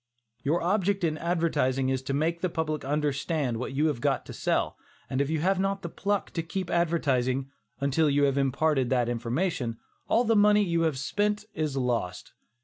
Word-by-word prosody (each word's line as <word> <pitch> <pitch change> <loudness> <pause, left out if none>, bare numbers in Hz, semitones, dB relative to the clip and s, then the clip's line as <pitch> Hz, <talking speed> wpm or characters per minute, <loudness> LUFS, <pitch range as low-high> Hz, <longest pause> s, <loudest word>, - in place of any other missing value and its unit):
Your 160 +5 0
object 195 +1 +1
in 160 -2 +1
advertising 160 -6 +1
is 130 -1 0
to 135 +1 -3
make 165 +3 0
the 185 - +1
public 155 -2 -2
understand 145 -2 -1
what 125 +3 -4
you 145 +3 +1
have 145 -7 0
got 140 -1 0
to - - -8
sell, - - 0 0.4
and 130 +1 +1
if 140 - 0
you 160 -1 0
have 190 +2 +2
not 195 0 -1
the 170 - -4
pluck 205 +3 -2
to 165 - -2
keep 175 +2 -4
advertising, 135 -6 +1 0.3
until 140 +3 +2
you 145 0 +2
have 140 -1 +3
imparted 140 -1 +1
that 125 -2 +2
information, 120 +1 -1 0.3
all 235 - +3
the 225 -1 +2
money 210 0 +5
you 170 -3 +1
have 140 - -6
spent 210 +8 -1
is 155 -4 -2
lost. 115 -8 -2
155 Hz, 190 wpm, -28 LUFS, 135-175 Hz, 0.4 s, money